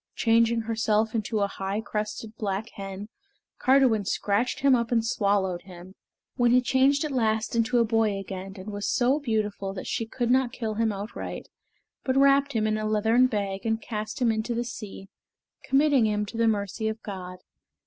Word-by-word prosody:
Changing 230 0 +3
herself 220 -1 0
into 220 -1 -1
a 200 - +2
high 195 +1 -3
crested 215 0 -4
black 210 +1 -3
hen, 195 +1 -7 0.5
Cardiwen 255 -5 +4
scratched 205 +5 -1
him 275 -1 +5
up 235 -2 +1
and 230 -2 +2
swallowed 200 -5 0
him, 185 -1 -12 0.4
when 245 -1 +4
he 250 +1 +6
changed 265 +4 +2
at 300 - -3
last 225 -2 0
into 230 +2 +2
a 235 - +4
boy 220 -2 +1
again 195 0 -7
and 190 +3 -7
was 205 0 -3
so 260 +4 +2
beautiful 210 -6 -2
that 185 - -6
she 230 - -2
could 240 +1 -1
not 260 -1 +3
kill 225 -3 -3
him 225 +1 +1
outright, 205 +2 -6 0.5
but 260 0 0
wrapped 275 +1 +4
him 220 -2 +1
in 215 0 0
a 215 - -3
leathern 220 +4 +3
bag 200 -4 -3
and 225 -1 0
cast 215 +3 -5
him 240 -3 +3
into 220 +2 -2
the 240 - 0
sea, 210 -4 -8 0.6
committing 270 -3 +3
him 210 0 0
to 210 - -10
the 230 0 +2
mercy 210 0 -1
of 220 0 -3
God. 185 -3 -7
220 Hz, 185 wpm, -26 LUFS, 205-240 Hz, 0.6 s, he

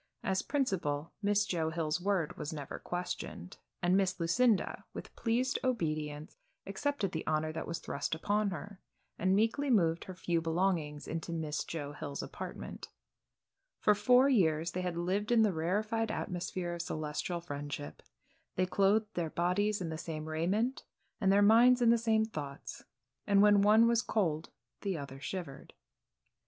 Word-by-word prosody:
As 190 0 +1
principal, 170 - -1
Miss 205 0 +2
Joe 165 -5 -1
Hill's 160 0 -1
word 185 -5 0
was 150 - -5
never 145 -3 -6
questioned, 175 - -5 0.3
and 175 +1 +4
Miss 190 -2 +1
Lucinda, 205 +6 +2
with - - -8
pleased 250 +3 0
obedience, 155 - -2 0.3
accepted 200 0 -2
the 160 - -3
honor 155 0 0
that 160 - -5
was 170 - -3
thrust 140 +3 -3
upon 205 +5 0
her, 200 +1 -7 0.4
and 185 +2 +3
meekly 225 +7 +1
moved 170 -8 +2
her 185 - -8
few 170 -2 0
belongings 165 -3 -1
into 165 +1 -4
Miss 155 -2 -2
Joe 145 -3 -5
Hill's 145 -1 -5
apartment. - - -7 0.9
For 210 - +5
four 250 +6 +5
years 170 - +2
they 185 - -3
had 180 -2 -3
lived 195 +6 -1
in 230 -2 +5
the 210 -3 +2
rarified 215 +7 0
atmosphere 175 -1 -3
of 170 - -3
celestial 155 +2 -3
friendship. 145 - -6 0.5
They 185 - +2
clothed 205 +3 +2
their 170 -2 -2
bodies 190 +5 0
in 170 - -3
the 160 0 -5
same 155 -2 -5
raiment, 185 +11 0 0.4
and 195 -3 +3
their 200 +1 +5
minds 240 +4 +6
in 235 -1 +5
the 235 - +4
same 220 -1 +2
thoughts, 145 -9 -7 0.4
and 200 -1 +4
when 205 -1 +6
one 215 +3 +6
was 235 -1 +3
cold 170 -9 -1 0.3
the 195 -4 -2
other 140 -2 -7
shivered. 165 -2 -6
180 Hz, 160 wpm, -32 LUFS, 160-210 Hz, 0.9 s, minds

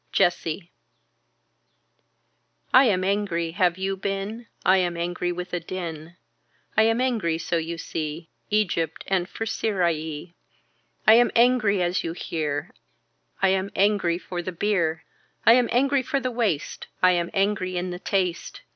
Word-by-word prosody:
Jessie 175 -1 0 2.0
I 260 +2 +8
am 190 -6 +2
angry. 185 -4 0
Have 180 0 +1
you 195 +1 -1
been. 200 +4 -4 0.2
I 190 +1 +6
am 175 -2 0
angry 175 +1 -2
with 180 +1 -6
a 175 - 0
din. 170 -2 -6 0.6
I 220 - +5
am 225 +1 +1
angry 225 -11 0
so 170 +1 -1
you 165 +1 -3
see. 160 0 -5 0.2
Egypt 175 -7 0
and 185 -2 0
for 225 - -4
Syrie. 170 -7 -2 0.7
I 220 - +8
am 240 +1 +6
angry 230 -6 +4
as 175 +1 0
you 165 - -3
hear. 150 -4 -3 0.7
I 195 - +6
am 190 +1 0
angry 195 -4 +2
for 180 0 -5
the 185 - -5
bier. 170 -4 0 0.4
I 230 - +9
am 245 -1 +3
angry 275 +2 +3
for 275 +2 -1
the 255 -1 -2
waist. 215 -11 -2 0.2
I 185 - +7
am 175 -1 0
angry 195 -2 0
in 180 +1 -2
the 175 - -6
taste. 185 -2 -2
185 Hz, 150 wpm, -25 LUFS, 170-210 Hz, 2.0 s, I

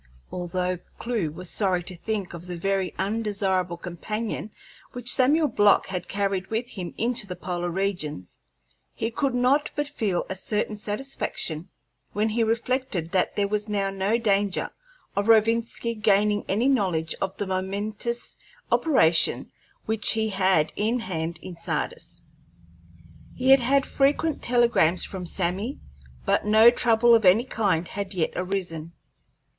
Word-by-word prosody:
Although 180 0 -2 0.2
Clewe 230 -9 -2
was 180 +4 -7
sorry 185 -2 0
to 180 +1 -5
think 200 0 -3
of 170 +1 -9
the 175 -1 -5
very 195 +1 0
undesirable 195 -4 -1
companion 210 +5 -4 0.4
which 245 -1 +1
Samuel 295 +5 +4
Block 205 -6 +4
had 180 -2 -4
carried 195 -1 -1
with 230 +2 -2
him 180 -4 -7
into 235 -3 -1
the 180 - -5
polar 175 -1 -3
regions, 175 - -3 0.6
he 225 - -2
could 270 0 -1
not 260 +4 +2
but 290 0 -1
feel 215 -11 -1
a - - -3
certain 210 +2 -2
satisfaction 205 - -3 0.4
when 215 +2 +1
he 225 +2 +1
reflected 230 -6 -1
that 185 - +1
there 200 -1 +1
was 210 +1 -1
now 200 -2 0
no 195 +4 +1
danger 205 -4 0 0.4
of 200 +1 0
Rovinski 230 +1 +3
gaining 210 -1 +2
any 220 +7 +2
knowledge 185 -11 +1
of 195 0 -2
the 205 - -2
momentous 205 +5 -2 0.3
operations 170 - +3 0.3
which 220 0 +1
he 220 0 0
had 190 -5 +2
in 225 +4 0
hand 170 -4 -3
in 175 -2 -8
Sardis. - - -4 1.1
He 255 +1 0
had 270 - +8
had 270 +3 +2
frequent 290 +3 +1
telegrams 235 -8 +3
from 185 -2 -6
Sammy, 190 +9 -2 0.5
but - - +2
no 220 +3 +7
trouble 235 -1 +4
of 225 -1 +5
any 195 +6 +5
kind 195 -9 0
had 200 +1 -5
yet 165 -3 0
arisen. 180 -3 -3
205 Hz, 145 wpm, -25 LUFS, 180-230 Hz, 1.1 s, had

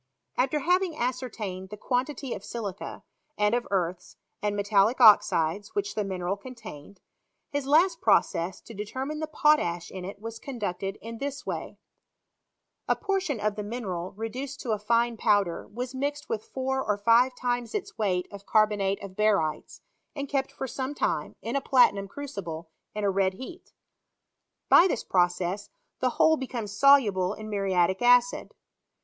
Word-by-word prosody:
After 270 +3 +1
having 360 +1 +1
ascertained 225 -7 -3
the 210 - -8
quantity 255 +3 -2
of - - -7
silica, 205 -5 -6 0.3
and 210 +1 +2
of 240 0 0
earths, 180 -2 -2 0.2
and 205 0 0
metallic 205 +4 +2
oxides, 200 -4 +5
which 205 0 -1
the 210 - -1
mineral 185 -1 -2
con 255 +5 -10
tained, 200 -5 -11 0.5
his 285 -2 -2
last 335 +4 +4
process 185 -4 +2
to 230 - -12
determine 260 +9 -4
the 315 - -3
potash 295 - +2
in 185 -1 -7
it 200 +2 -7
was 225 +1 -7
conducted 200 -7 -4
in 230 0 -7
this 280 0 -4
way: - - -5 1.1
A - - +3
portion 380 - -1
of 210 0 0
the 210 - -4
mineral 200 -5 -5
leduced 255 +5 -5
to 240 - -3
a 215 - 0
fine 230 +2 +1
po\Mer 205 -6 +1
was 245 +4 -5
mixed 285 +2 -3
with 215 -1 -3
four 265 0 -2
or 210 -1 0
five 235 +5 +4
times 245 - -2
its 410 - -4
weight 185 -4 0
of 200 -1 -11
carbonate 210 -2 +2
of 190 -1 -8
barytes, 200 -8 0 0.3
and 280 -1 -4
kept 275 -1 -1
for 265 - -5
some 265 +3 -4
time - - -1
(in - - -3
a 275 - +1
platinum 225 -8 +4
crucible) 180 - -7 0.2
in 210 - -3
a 200 - +3
red 190 0 +1
heat. 330 - -10 1.0
By 350 - +7
this 315 - -2
process, 180 +2 0 0.3
the - - +2
whole 315 0 +5
becomes 235 -7 -5
soluble 210 -8 +4
in 215 0 -8
muriatic 190 -2 +1
acid. 245 0 +3
215 Hz, 160 wpm, -27 LUFS, 195-260 Hz, 1.1 s, By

